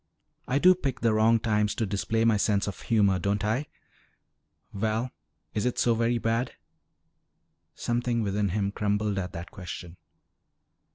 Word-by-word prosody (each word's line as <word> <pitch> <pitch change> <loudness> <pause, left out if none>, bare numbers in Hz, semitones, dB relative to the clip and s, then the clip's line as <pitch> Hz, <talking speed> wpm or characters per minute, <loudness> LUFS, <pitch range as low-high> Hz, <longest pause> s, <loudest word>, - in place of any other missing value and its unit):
"I 130 - +1
do 180 +5 +7
pick 135 -8 -3
the 115 -2 +3
wrong 110 +1 +4
times 105 -2 +1
to 115 - 0
display 100 +3 0
my 115 -1 +4
sense 100 -1 +1
of 100 - -6
humor, 100 -5 +2
don't 100 +2 0
I? 125 +8 0 1.1
Val, 110 +4 -1 0.4
is 105 - -1
it 125 - -2
so 120 - +3
very 115 +1 +1
bad?" 115 +2 -1 1.2
Something 120 -1 -1
within 100 0 0
him 100 +1 -1
crumbled 105 0 0
at 90 -1 -4
that 85 +1 -7
question. 90 -1 -8
110 Hz, 150 wpm, -27 LUFS, 100-115 Hz, 1.2 s, do